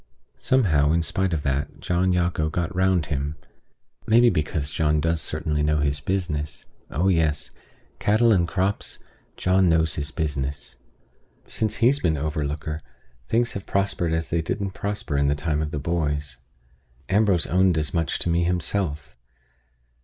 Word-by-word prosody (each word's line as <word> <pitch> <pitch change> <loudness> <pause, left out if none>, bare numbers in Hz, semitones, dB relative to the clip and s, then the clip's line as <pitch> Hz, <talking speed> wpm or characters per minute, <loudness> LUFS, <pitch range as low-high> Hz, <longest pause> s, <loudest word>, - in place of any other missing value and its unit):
Somehow, 80 - +3
in 85 0 +2
spite 95 +2 0
of 80 -3 -1
that, 70 +2 -2
John 90 +1 +1
Jago 85 -3 +1
got 85 +1 -2
round 95 -3 +2
him; 70 +1 -3 0.7
maybe 120 +2 +6
because 75 -1 -1
John 75 -1 +1
does 80 +1 +1
certainly 75 0 -2
know 75 0 +2
his 70 -1 0
business. 75 -4 -3 0.2
Oh 85 +7 0
yes! 80 -5 +1 0.5
Cattle 110 +2 +4
and 85 -4 +2
crops, 95 +3 -1 0.4
John 95 0 +3
knows 80 -2 +2
his 75 0 -3
business. 70 -2 -3 0.7
Since 110 -1 -1
he's 125 +6 +3
been 80 - +1
overlooker, 75 +1 -3 0.5
things 115 +1 +1
have 100 - -7
prospered 100 -4 0
as 80 0 -2
they 85 - +1
didn't 100 +4 -3
prosper 100 -7 -2
in 70 - +2
the 70 - +2
time 75 0 -1
of 75 - -2
the 75 - -4
boys. 75 -3 -2 0.7
Ambrose 100 -4 +3
owned 90 -1 +3
as 75 -3 -1
much 80 -3 0
to - - 0
me 85 +1 +2
himself. 85 -6 -2
80 Hz, 155 wpm, -24 LUFS, 75-95 Hz, 0.7 s, maybe